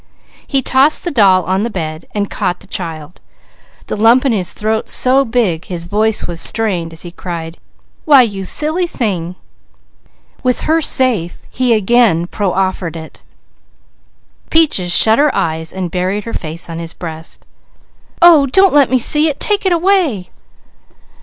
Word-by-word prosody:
He 270 -2 -1
tossed 270 +5 +2
the 350 - -3
doll 195 -7 +3
on 190 +2 -1
the 230 - -2
bed, 160 -5 -6
and 205 -1 -1
caught 180 -3 -3
the - - -13
child, 165 -4 -7 0.6
the - - -5
lump 230 +5 +3
in 270 - +2
his 190 -6 -1
throat 220 +1 -3
so 265 +2 +3
big 225 -9 -1
his 175 -2 -6
voice 210 +5 0
was 170 -1 0
strained 185 -7 +2
as 165 - -6
he 175 - -9
cried: 170 -2 -8 0.4
"Why 280 -4 +6
you 200 -4 -4
silly 310 - 0
thing!" 185 - -4 1.1
With 255 -2 -1
her 325 +1 0
safe 245 - +1
he 250 -2 +1
again 215 -5 +2
proffered 185 -3 -3
it. 160 -1 -11 1.3
Peaches 300 - +2
shut 220 +6 +5
her 300 +1 +3
eyes 160 0 -2
and 185 -3 -5
buried 185 +3 -2
her 230 - -8
face 160 +1 -5
on 165 -1 -7
his 165 -1 -7
breast. 160 -2 -9 0.8
"Oh 320 -5 +6
don't 385 +8 +3
let 285 -2 +4
me 260 - +2
see 300 +6 +3
it! 290 -3 -4
Take 410 -2 +2
it - - +1
away!" 340 - 0
205 Hz, 160 wpm, -14 LUFS, 175-260 Hz, 1.3 s, Why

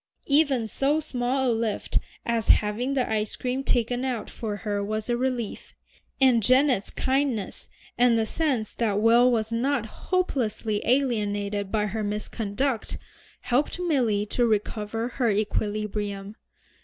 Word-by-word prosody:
Even 280 -5 +3
so 275 +7 +1
small 260 -3 0
a - - +2
lift 225 -2 -1 0.3
as 230 -1 0
having 230 +6 +2
the 255 -2 +1
ice 215 -1 -1
cream 255 +2 -2
taken 245 0 0
out 250 -4 -3
for 215 -3 -4
her 205 -1 -2
was 215 +3 -3
a - - +2
relief, 245 -3 -3 0.4
and 255 -4 +5
Janet's 255 -1 +3
kindness, 260 -6 -1 0.3
and 240 -1 +5
the 225 - +1
sense 255 -4 -1
that 210 -4 0
Will 235 +3 +5
was 220 -1 0
not 245 +1 0
hopelessly 225 - -1
alienated 205 -6 0
by 210 -1 +1
her 215 +1 -3
misconduct, 210 +4 -2 0.4
helped 265 +8 0
Milly 250 - +1
to 240 +3 +1
recover 215 +1 -1
her 245 -1 0
equilibrium. 205 -1 -2
230 Hz, 135 wpm, -26 LUFS, 210-255 Hz, 0.4 s, and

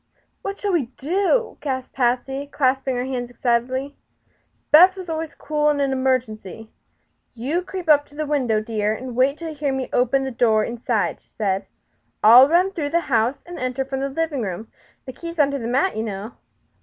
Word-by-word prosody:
"What 395 0 -5
shall 410 - -2
we 305 -9 +1
do?" 390 - 0
gasped 260 -3 -4
Patsy, 265 +2 -1
clasping 265 -2 0
her 245 +1 -2
hands 250 -2 -4
excitedly. 255 +3 -1 0.8
Beth 360 +5 +8
was 370 -3 -7
always 320 0 -4
cool 300 -1 0
in 295 -1 +1
an 275 -1 +1
emergency. 230 -5 -2 0.6
"You 275 +10 -1
creep 365 -1 -7
up 290 -2 +5
to 290 - -19
the 305 +1 -2
window, 260 -7 +1
dear, 215 -1 -1
and 250 +1 -7
wait 265 +4 +2
till 335 -1 -6
you - - -6
hear 290 -1 -2
me 265 -1 -3
open 255 +2 +2
the 265 - -2
inside 240 - -12
door," 230 0 0
said 195 -2 0
she. - - -39 0.6
"I'll 245 +6 +9
run 360 +4 +3
through 305 -6 -3
the 340 +3 +1
house 235 +3 +1
and 350 0 -8
enter 255 +1 -2
from 270 0 -4
the 275 +1 -2
living 300 -1 -2
room. 205 +1 -5 0.4
The 260 - -7
key 335 +6 -7
is 335 - -9
under 280 -2 +2
the 230 - -4
mat, 270 +10 +1
you 220 - -1
know." 210 0 -5
265 Hz, 195 wpm, -22 LUFS, 240-300 Hz, 0.8 s, I'll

